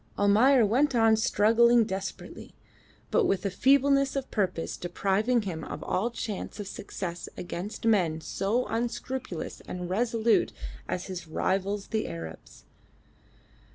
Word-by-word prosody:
Almayer 225 +5 +5
went 260 +6 +2
on 225 -1 +5
struggling 230 +2 +4
desperately, 190 -2 -6 0.6
but 470 - +3
with 195 0 0
a 200 - 0
feebleness 275 +5 +3
of 270 -1 -3
purpose 185 -6 -1
depriving 200 +7 0
him 165 -5 -5
of - - -6
all 215 +6 0
chance 220 -3 -5
of 205 - -5
success 180 -3 -6
against 180 +5 -6
men 180 -8 +2
so 205 +9 -1
unscrupulous 235 -4 -4
and 180 0 -5
resolute 230 +2 +2 0.3
as 180 - -3
his 180 -3 -6
rivals 195 +5 -1
the 220 - -1
Arabs. 80 -1 -9
210 Hz, 125 wpm, -28 LUFS, 185-235 Hz, 0.6 s, Almayer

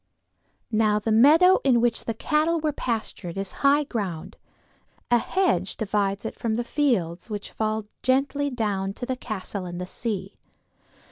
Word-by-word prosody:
Now 215 -1 +3
the 210 +1 -1
meadow 310 +11 +6
in 255 -4 +4
which 235 -1 0
the 230 - -2
cattle 315 +6 +1
were 310 -1 0
pastured 220 - -4
is 195 -1 -3
high 285 +1 +5
ground; 200 - -4 0.8
a 240 - +6
hedge 230 - 0
divides 200 -2 -1
it - - -3
from 225 -2 -2
the 240 - -1
fields 230 - 0
which 205 -1 -5
fall 215 -1 -2 0.2
gently 275 +2 +1
down 205 -6 -2
to 245 - -6
the 260 0 -2
castle 205 -5 -5
and 175 0 -6
the 180 - -3
sea. 195 0 -4
225 Hz, 155 wpm, -25 LUFS, 200-270 Hz, 0.8 s, meadow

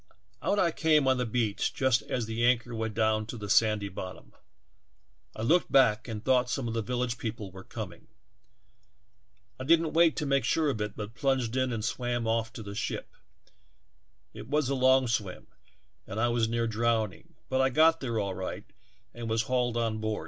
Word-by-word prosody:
Out 205 - 0
I 175 -4 +3
came 155 -3 +3 0.3
beach 110 -4 0
just 130 -3 +2
as 120 -3 -3
the 115 +1 -2
anchor 120 0 +2
went 110 -2 -3
down 110 -1 +1
to 120 - -6
the 105 -2 -4
sandy 105 -2 +3
bottom; 95 -1 -8 1.0
I 110 - -5
looked 170 +9 +2
back 125 -4 +4
and 110 -2 -6
thought 130 -1 +3
some 130 -1 -2
of 115 - -3
the 115 - -1
village 120 +1 -2
people 110 -4 -5
were 95 +1 -11
coming. - - -8 1.5
I - - -4
didn't 160 -2 +3
sure 155 -3 +2
of 110 - -4
it 105 0 -3
but 105 +1 -6
plunged 130 -3 0
in 130 -1 +1
and 110 -2 -3
the 115 -3 -2
ship. - - -4 1.2
It - - -9
was 145 -1 +1
a - - +1
long 130 0 +4
swim, 105 -5 -2 0.6
was 115 +2 0
near 115 0 0
drowning, 115 -2 -1
but 130 0 +1
I 130 - +3
got 160 +3 +4
all 110 -6 -1
right 95 0 -5 0.5
and 120 -1 -6
was 115 +1 +1
hauled 120 0 0
on 115 -2 -1
board. 110 -1 -2
120 Hz, 165 wpm, -29 LUFS, 110-130 Hz, 1.5 s, back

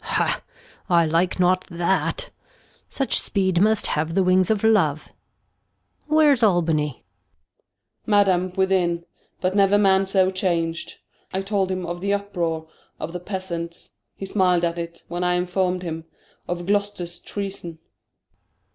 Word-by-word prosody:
Gon. - - -9
Ha! - - +1 0.5
I 170 -2 +4
like 165 +4 +1
not 185 +1 +3
that, 170 -2 0 0.6
Such 270 - +2
speed 190 -3 0
must 215 +1 +3
have 160 +2 -1
the 195 - +3
Wings 185 0 +3
of 215 -2 +1
Love; 165 -10 +2 1.0
where's 300 -4 +4
Albany'^. 165 - +2
Gent. - - -30 1.0
Madam, 190 -3 +3
within, 180 -3 +1 0.4
but 185 +1 0
never 200 0 +4
Man 195 -1 +3
so 190 -1 +3
chang'd; 170 -3 -1 0.4
I 190 - -1
told 195 -1 0
him 185 -1 -3
of 175 +1 -5
the 200 +1 +1
Uproar 170 -6 -3 0.3
of 165 - -5
the 180 - -4
Peasants, 175 -3 -5 0.2
He 195 - -6
smil'd 180 -3 +2
at 170 0 -2
it, 170 0 -7
when 175 +1 -3
I 180 0 +2
inform'd 180 0 0
him 165 -1 -5 0.4
Of 175 0 -3
Gloster's 200 -3 -2
Treason. 195 -4 -6
Gon. 160 - -23
185 Hz, 145 wpm, -23 LUFS, 170-195 Hz, 1.0 s, I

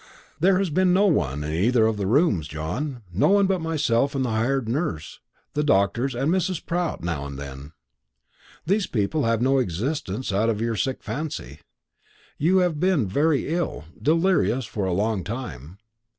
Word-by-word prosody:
"There 185 +3 +4
has 190 -3 0
been 185 +3 +3
no 195 +3 +4
one 75 - +1
in 75 +1 -3
either 110 +7 +3
of 110 0 +1
the 100 -2 -2
rooms, 110 - +2
John; 115 - -4
no 95 - +3
one 200 0 +4
but 190 -2 0
myself 145 -4 +1
and 130 -1 0
the 120 - -2
hired 120 +3 0
nurse, 115 - -3 0.3
the 150 - 0
doctors, 120 +1 +1
and 135 +6 0
Mrs. 185 -1 -1
Pratt 175 - -2
now 80 -5 -2
and 70 -1 -8
then. 70 +1 -8 0.9
These 195 +4 +1
people 120 +7 0
have 115 0 +1
no 135 +1 +3
existence 115 - -2
out 105 +4 +2
of 110 -2 -1
your 115 0 -1
sick 130 +5 -2
fancy. 135 - -5 0.8
You 175 +6 +3
have 160 -4 -2
been 180 - +2
very 145 +8 +1
ill, 170 - -2 0.2
delirious, 155 - +2
for 105 -3 -3
a - - 0
long 100 +1 0
time. 95 - -7
125 Hz, 175 wpm, -24 LUFS, 100-160 Hz, 0.9 s, There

